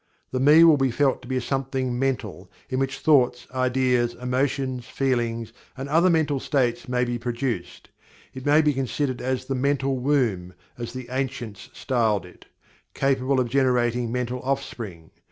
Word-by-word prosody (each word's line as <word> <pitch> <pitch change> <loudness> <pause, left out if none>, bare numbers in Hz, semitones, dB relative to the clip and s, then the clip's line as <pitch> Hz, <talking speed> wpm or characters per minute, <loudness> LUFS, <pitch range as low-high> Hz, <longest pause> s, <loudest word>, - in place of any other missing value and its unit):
The 130 - -1
"Me" 150 +5 +7
will 160 -3 +7
be 135 -1 +2
felt 135 +3 +1
to 125 - -12
be 130 0 -1
a - - -1
Something 130 -1 -2
mental 135 -1 -2 0.2
in 130 - 0
which 135 0 -1
thoughts, 130 -5 +3
ideas, 130 -2 +1
emotions, 130 0 -2
feelings, 115 -4 -1 0.2
and 135 +1 -5
other 165 +5 +4
mental 155 -5 +2
states 125 -3 0
may 125 0 +1
be 120 0 -3
produced. 115 -7 -4 0.4
It 130 - -8
may 150 +3 +4
be 150 -1 +3
considered 135 0 -2
as 130 0 -2
the 135 - -2
"mental 135 0 0
womb," 115 -10 0 0.2
as 120 -1 -6
the 130 -1 -7
ancients 130 -5 -4
styled 110 -7 0
it 90 - -16 0.5
capable 135 0 +1
of 125 - +1
generating 120 -2 +1
mental 125 0 -2
offspring. 115 -11 -4
130 Hz, 160 wpm, -24 LUFS, 120-135 Hz, 0.5 s, Me